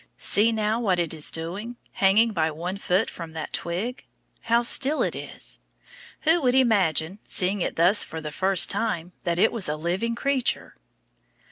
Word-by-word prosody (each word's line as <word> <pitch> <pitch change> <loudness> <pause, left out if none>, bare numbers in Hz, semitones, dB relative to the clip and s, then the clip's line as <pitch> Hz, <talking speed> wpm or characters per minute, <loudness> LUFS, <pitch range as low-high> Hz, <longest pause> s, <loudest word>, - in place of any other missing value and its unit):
See 215 +3 +2
now, 220 0 -1
what 195 -6 +1
it 170 -2 -1
is 155 -2 0
doing, 190 +9 -6 0.2
hanging 215 +4 +3
by 160 -4 +1
one 175 +5 -5
foot 190 +3 +1
from 165 -2 -8
that 160 - -6
twig. 195 +9 -4 0.4
How 235 +1 +1
still 275 +5 +3
it - - -1
is. - - -6 0.6
Who 330 +2 +3
would 255 -2 +2
imagine, 195 - +2
seeing 195 0 0
it - - -2
thus 180 +6 +4
for 160 - -7
the 155 -1 -6
first 190 +3 +5
time, 180 -6 -3
that 170 -1 0
it 220 - +3
was 215 -9 -2
a 150 - -1
living 180 +9 -2
creature? 265 0 -1
195 Hz, 170 wpm, -24 LUFS, 170-230 Hz, 0.6 s, first